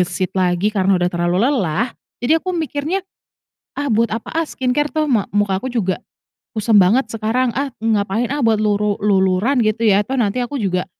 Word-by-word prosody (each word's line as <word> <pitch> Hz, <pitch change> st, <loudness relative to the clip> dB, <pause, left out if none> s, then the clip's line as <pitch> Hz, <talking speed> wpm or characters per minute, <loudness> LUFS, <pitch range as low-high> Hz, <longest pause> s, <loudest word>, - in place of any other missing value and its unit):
gesit 185 Hz, +1 st, -1 dB
lagi 185 Hz, +2 st, +1 dB
karena 195 Hz, -2 st, +2 dB
udah 180 Hz, 0 st, 0 dB
terlalu 175 Hz, +1 st, 0 dB
lelah. 235 Hz, -, 0 dB, 0.3 s
Jadi 320 Hz, +5 st, +3 dB
aku 365 Hz, +1 st, -3 dB
mikirnya, 320 Hz, +4 st, -2 dB, 0.7 s
"Ah, 285 Hz, -, -1 dB
buat 230 Hz, -1 st, +1 dB
apa 225 Hz, +6 st, -5 dB
ah 330 Hz, -, +2 dB
skincare? 295 Hz, 0 st, -1 dB
Toh, 310 Hz, -1 st, 0 dB
ma 230 Hz, -8 st, 0 dB
muka 200 Hz, -2 st, 0 dB
aku 260 Hz, -, -3 dB
juga 195 Hz, -7 st, -1 dB, 0.5 s
kusam 215 Hz, -1 st, +2 dB
banget 215 Hz, +6 st, +4 dB
sekarang. 225 Hz, +3 st, 0 dB
Ah, 275 Hz, -2 st, -2 dB
ngapain 220 Hz, +1 st, 0 dB
ah 285 Hz, -3 st, 0 dB
buat 220 Hz, -1 st, +2 dB
luru 210 Hz, 0 st, +1 dB
luluran 195 Hz, +5 st, +2 dB
gitu 215 Hz, +2 st, 0 dB
ya? 200 Hz, 0 st, +3 dB
Toh, 265 Hz, -, -4 dB
nanti 235 Hz, -3 st, 0 dB
aku 250 Hz, +1 st, -2 dB
juga, 180 Hz, -2 st, -1 dB
220 Hz, 185 wpm, -19 LUFS, 195-260 Hz, 0.7 s, banget